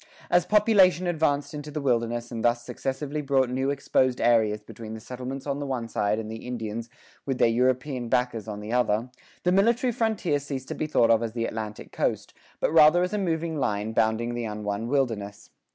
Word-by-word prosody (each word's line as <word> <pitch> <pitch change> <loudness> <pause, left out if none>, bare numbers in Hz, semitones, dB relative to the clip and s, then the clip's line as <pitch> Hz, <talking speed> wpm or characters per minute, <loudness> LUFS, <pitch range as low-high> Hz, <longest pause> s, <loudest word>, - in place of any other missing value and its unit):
As 175 0 +4
population 200 -4 +4
advanced 155 -4 0
into 150 0 -6
the 150 +1 -4
wilderness 120 -3 -1
and 115 -2 -4
thus 120 0 +2
successively 145 +3 -3
brought 135 -3 +1
new 130 +2 0
exposed 130 -2 +1
areas 110 -3 +3
between 110 0 -9
the - - -7
settlements 130 +3 -6
on 140 -1 -2
the 145 - -3
one 125 -4 -3
side 105 -1 0
and 110 -1 -4
the 110 +2 -7
Indians 115 -1 -4 0.4
with 135 -2 -1
their - - +4
European 125 +1 0
backers 125 -3 0
on 105 -1 -5
the 105 +3 -5
other, 120 0 +1 0.3
the 180 - +2
military 235 +6 +3
frontier 215 -10 0
ceased 135 -2 -6
to - - -2
be 155 - -3
thought 115 -6 +3
of 115 0 +4
as 115 -2 -3
the 115 -1 -1
Atlantic 110 -2 -6
coast, - - -2 0.3
but - - 0
rather 160 +2 +7
as 180 - -2
a 210 - 0
moving 165 -4 -1
line 105 -3 -1
bounding 115 +1 +1
the 120 -1 -3
un 105 0 -6
won 105 +2 -2
wilderness. 115 -7 -2
125 Hz, 200 wpm, -26 LUFS, 115-150 Hz, 0.4 s, rather